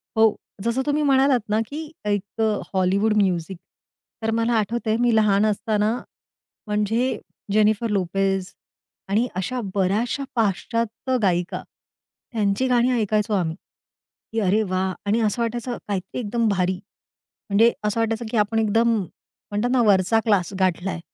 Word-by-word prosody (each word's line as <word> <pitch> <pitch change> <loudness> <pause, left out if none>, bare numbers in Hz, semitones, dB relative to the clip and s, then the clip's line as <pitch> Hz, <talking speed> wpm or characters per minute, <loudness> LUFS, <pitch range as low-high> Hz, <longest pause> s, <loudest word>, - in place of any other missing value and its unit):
हो. 220 -1 +4 0.3
जसं 235 +3 0
तुम्ही 295 +1 +1
म्हणालात 270 -2 +4
ना 215 +1 +2
की 305 +1 -7
एक 205 +1 -2
अ, 215 -2 +1
हॉलिवूड 195 +3 +2
म्युझिक. 185 -3 0 0.6
तर 225 0 0
मला 230 +1 +1
आठवतंय 220 +1 -1
मी 240 -1 +3
लहान 210 -1 +4
असताना 215 +1 +1 0.7
म्हणजे 215 +5 0 0.3
जेनिफर 215 +2 +3
लोपेज 195 -1 0 0.6
आणि 220 +5 +2
अशा 200 +8 -2
बऱ्याचशा 205 +8 0
पाश्चात्य 230 +4 0
गायिका, 180 -3 0 0.7
त्यांची 215 +2 +1
गाणी 250 0 +3
ऐकायचो 215 +1 0
आम्ही. 170 -5 0 0.8
की 225 - -1
अरे, 205 +1 +2
वाह! 185 -1 -1
आणि 210 +3 +2
असं 220 +2 0
वाटायचं 240 +1 -2
काहीतरी 195 +3 -3
एकदम 230 0 0
भारी. 185 -2 +1 0.7
म्हणजे 220 +4 +5
असं 210 +2 0
वाटायचं 225 +1 -1
की 235 - 0
आपण 210 +2 +2
एकदम 225 +2 +2
म्हणतात 205 +4 -5
ना 255 -2 +3
वरचा 205 +1 +4
क्लास 200 -4 +2
गाठला 185 0 +1
आहे 175 - -5
215 Hz, 140 wpm, -23 LUFS, 195-230 Hz, 0.8 s, म्हणजे